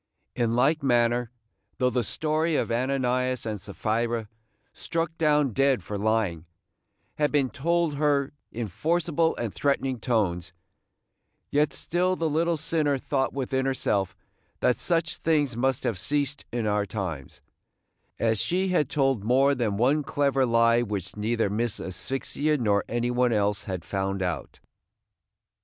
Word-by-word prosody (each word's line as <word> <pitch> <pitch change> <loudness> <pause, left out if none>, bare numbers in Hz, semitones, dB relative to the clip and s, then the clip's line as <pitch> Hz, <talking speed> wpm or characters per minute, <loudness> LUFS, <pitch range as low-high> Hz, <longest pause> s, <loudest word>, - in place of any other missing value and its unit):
In 115 -2 +1
like 140 +6 +3
manner, 120 -2 +2 0.5
though 125 0 +2
the 125 0 0
story 155 - 0
of - - 0
Ananias 130 0 0
and 105 -3 -4
Sapphira, 115 +3 -2 0.5
struck 165 -1 -2
down 150 -5 +3
dead 135 -5 +2
for 105 - -5
lying, 100 -6 0 0.7
had 150 -1 +2
been 140 -4 +1
told 170 +1 0
her 145 -2 +1 0.2
in 115 -1 -4
forcible 165 - 0
and 115 -4 -4
threatening 135 -3 0
tones, 95 -8 -1 1.0
yet 150 +1 +2
still 180 +2 0
the 165 -2 -1
little 165 +2 +1
sinner 155 -2 +1
thought 135 0 -1
within 130 0 -1
herself 105 -7 0 0.4
that 125 - +2
such 165 -2 0
things 145 -6 +1
must 130 +1 0
have 100 -6 -1
ceased 145 +4 0
in 120 -2 -2
our 105 -1 +1
times, 90 -10 -5 0.7
as 110 -2 +1
she 185 +2 +1
had 155 -7 +1
told 135 -7 +1
more 135 +5 +4
than 115 -6 -1
one 135 +7 +3
clever 140 -2 +1
lie 115 0 +4
which 100 -4 -4
neither 110 +1 0
Miss 110 +2 -1
Asphyxia 135 +10 -1
nor 105 -5 +1
any 120 +1 0
one 125 0 +2
else 100 -1 0
had 90 -3 -5
found 95 0 -2
out. 90 -3 -4
125 Hz, 145 wpm, -26 LUFS, 110-145 Hz, 1.0 s, more